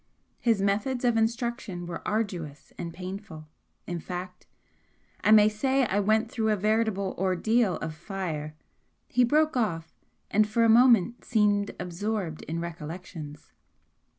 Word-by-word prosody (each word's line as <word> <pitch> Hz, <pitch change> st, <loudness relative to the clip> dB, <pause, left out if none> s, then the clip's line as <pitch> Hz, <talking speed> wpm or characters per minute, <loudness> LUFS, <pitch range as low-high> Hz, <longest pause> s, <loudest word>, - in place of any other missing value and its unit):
His 225 Hz, -5 st, +2 dB
methods 215 Hz, +6 st, 0 dB
of 240 Hz, -1 st, +3 dB
instruction 225 Hz, -5 st, -1 dB
were 170 Hz, -1 st, -6 dB
arduous 180 Hz, -9 st, -3 dB
and 170 Hz, -2 st, -5 dB
painful 180 Hz, -3 st, -8 dB, 0.4 s
in 175 Hz, -1 st, -4 dB
fact, 180 Hz, +2 st, -7 dB, 0.8 s
I -, -, +3 dB
may 215 Hz, -1 st, +8 dB
say 260 Hz, +5 st, +1 dB
I 205 Hz, -2 st, 0 dB
went 220 Hz, +3 st, +2 dB
through 220 Hz, -2 st, 0 dB
a 215 Hz, -, +3 dB
veritable 210 Hz, -1 st, 0 dB
ordeal 190 Hz, +2 st, +2 dB
of 160 Hz, -1 st, -5 dB
fire 155 Hz, -3 st, -5 dB, 0.3 s
" -, -, -46 dB
He 250 Hz, -, +6 dB
broke 305 Hz, +5 st, +3 dB
off, 165 Hz, -9 st, -1 dB, 0.4 s
and 215 Hz, +1 st, +4 dB
for 230 Hz, +2 st, +2 dB
a -, -, +5 dB
moment 235 Hz, -1 st, +5 dB
seemed 205 Hz, -3 st, +1 dB
absorbed 180 Hz, -1 st, -3 dB
in 165 Hz, +2 st, -3 dB
recollections. 165 Hz, -2 st, -8 dB
200 Hz, 140 wpm, -27 LUFS, 175-225 Hz, 0.8 s, may